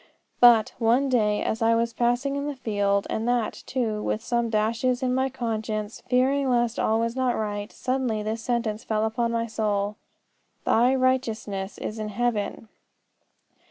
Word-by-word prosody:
"But, 235 -3 +6
one 245 +4 +3
day, 210 -4 +2
as 220 - -2
I 230 0 +4
was 230 0 0
passing 245 +4 0
in 280 +1 -2
the 290 - -3
field, 205 -5 0
and 225 +2 -2
that, 240 -3 0
too, 225 -5 -1
with 215 +1 -2
some 235 -1 0
dashes 230 +4 0
in 250 -1 +1
my 260 +1 +1
conscience, 220 -4 -3
fearing 265 +2 +2
lest 240 -2 +1
all 220 +1 +2
was 230 +1 -1
not 255 -2 +1
right, 205 0 -3
suddenly 255 -5 -1
this 220 +1 -3
sentence 230 -2 -2
fell 215 0 0
upon 230 +1 -1
my 230 0 0
soul, 210 -2 -1 0.7
Thy 245 +3 +4
Righteousness 225 -7 -1
is 220 - -5
in 215 -1 -3
heaven! 225 -1 -2
230 Hz, 160 wpm, -25 LUFS, 215-250 Hz, 0.7 s, But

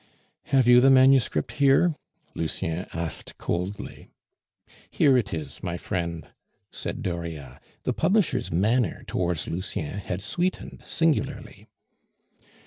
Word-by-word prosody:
"Have 135 -3 +3
you 125 0 +8
the 135 - +6
manuscript 130 - +4
here?" 145 +5 +4 0.4
Lucien 80 +2 -3
asked 85 0 -4
coldly. 90 +4 -4 0.8
"Here 135 -2 +4
it 115 -5 +1
is, 75 -3 -6
my 85 -1 -3
friend," 85 -3 -3 0.5
said 125 - -4
Dauriat. 85 - -5 0.2
The - - 0
publisher's 165 - +1
manner 110 +8 +1
towards 85 -4 -1
Lucien 90 0 -4
had 95 -1 -4
sweetened 175 - -3
singularly. 165 -2 -1
95 Hz, 110 wpm, -26 LUFS, 85-130 Hz, 0.8 s, you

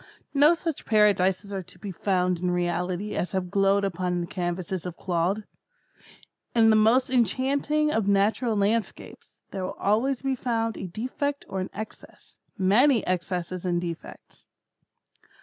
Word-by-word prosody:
No 295 +4 +6
such 330 -3 -4
Paradises 205 -2 +3
are 195 - -2
to 180 - -14
be 200 - -6
found 180 -1 0
in 180 +1 -1
reality 180 +3 -1
as 180 - -2
have 185 -2 -2
glowed 195 0 +3
upon 180 -2 -1
the 170 - -2
canvass 175 -1 -4
of 180 -2 -6
Claude. 180 +4 -1 1.1
In 225 -1 +6
the - - +5
most 230 +5 +4
enchanting 275 +6 +1
of 220 -6 0
natural 210 +4 +2
landscapes, 210 +2 -2 0.2
there 190 -2 -4
will - - -5
always 240 +6 +1
be 270 -1 +1
found 230 -3 -1
a 190 - -5
defect 260 +9 -3
or 195 - -4
an 185 - -3
excess—many 220 +3 -1
excesses 180 0 -2
and 175 -2 0
defects. 170 -2 -8
200 Hz, 145 wpm, -26 LUFS, 180-230 Hz, 1.1 s, No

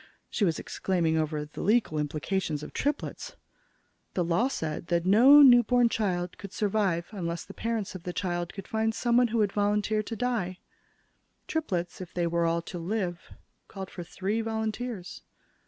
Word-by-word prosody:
She 205 - +1
was 165 -3 +1
exclaiming 170 -4 -1
over 155 -1 -1
the 150 - -8
legal 210 -6 +2
implications 150 +1 -2
of - - -9
triplets. 295 - -3 0.8
The 180 - +2
law 170 +9 +2
said 160 - -4
that 170 0 +1
no 255 +10 +8
newborn 245 -2 +6
child 180 -6 -2
could 200 -2 -8
survive 195 -5 0
unless 170 -5 -4
the - - -11
parents 225 -3 -3
of 185 - -7
the 180 - -4
child 175 -1 -2
could 195 - -9
find 220 0 0
someone 240 +1 +3
who 230 +1 -2
would 210 -3 +2
volunteer 210 +1 +1
to 225 +2 -6
die. 220 -6 -1 0.9
Triplets, 185 - -2
if 180 - -9
they 175 -1 +1
were 170 0 +1
all 165 0 0
to 175 - -7
live, 175 -1 -3 0.3
called 195 -2 -8
for 180 - -7
three 200 +6 -2
volunteers. 220 -3 -4
195 Hz, 165 wpm, -28 LUFS, 170-225 Hz, 0.9 s, no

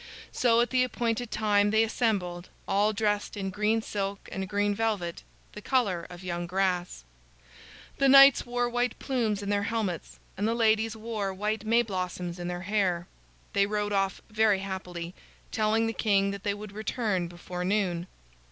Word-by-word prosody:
So 235 -2 +3
at 240 - 0
the 255 -1 +3
appointed 240 -1 -1
time 205 -2 +2
they 220 +1 +4
assembled, 195 -7 -1 0.2
all 205 +2 +3
dressed 210 -1 -1
in 195 -1 -3
green 210 +3 +1
silk 200 -2 -4
and 190 0 -4
green 205 +1 +1
velvet, 205 -6 -2 0.3
the 210 - -8
color 200 -10 0
of 180 +1 -10
young 175 -1 -3
grass. 180 - -1 1.0
The 275 -1 +4
knights 275 0 +8
wore 245 0 -1
white 245 +1 -1
plumes 225 -6 -1
in 200 - -4
their 205 0 +1
helmets, 200 -6 -3 0.2
and 205 +3 -1
the 230 - +1
ladies 220 -1 +2
wore 215 -3 -3
white 210 +2 -2
May 230 +2 +4
blossoms 180 -4 -4
in 175 - -4
their 175 0 -4
hair. 185 -3 0 0.5
They 200 0 +3
rode 210 0 -1
off 195 -1 0
very 215 -2 +3
happily, 180 -3 -5 0.4
telling 220 +1 +2
the 225 - -1
king 200 -3 +2
that 200 -1 -6
they 200 0 -1
would 210 0 -8
return 210 -3 -1
before 175 +1 -6
noon. 180 -3 0
205 Hz, 170 wpm, -28 LUFS, 185-225 Hz, 1.0 s, knights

